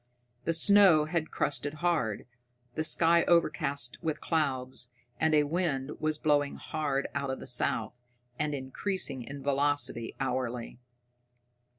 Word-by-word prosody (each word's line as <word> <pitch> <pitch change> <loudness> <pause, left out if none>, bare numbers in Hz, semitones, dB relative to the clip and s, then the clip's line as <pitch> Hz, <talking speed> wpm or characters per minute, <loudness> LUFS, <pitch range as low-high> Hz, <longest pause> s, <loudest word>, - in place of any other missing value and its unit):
The 165 - +1
snow 180 -2 +6
was 170 -2 +2
crusted 145 +1 -1
hard, 155 - -1 0.5
the 160 - -2
sky 170 +1 +4
overcast 145 -6 +1
with 155 -3 -2
clouds, 130 -6 -2 0.3
and 160 0 +3
a 150 - +5
wind 145 -3 -1
was 155 0 -1
blowing 145 -2 +1
hard 145 -3 -2
out 140 -1 -2
of 130 - -3
the - - -9
south, 115 -3 -1 0.5
and 150 -1 0
increasing 135 +1 -3
in 140 +3 -8
velocity 140 -4 +1
hourly. 125 -3 -3
145 Hz, 125 wpm, -29 LUFS, 130-160 Hz, 0.5 s, snow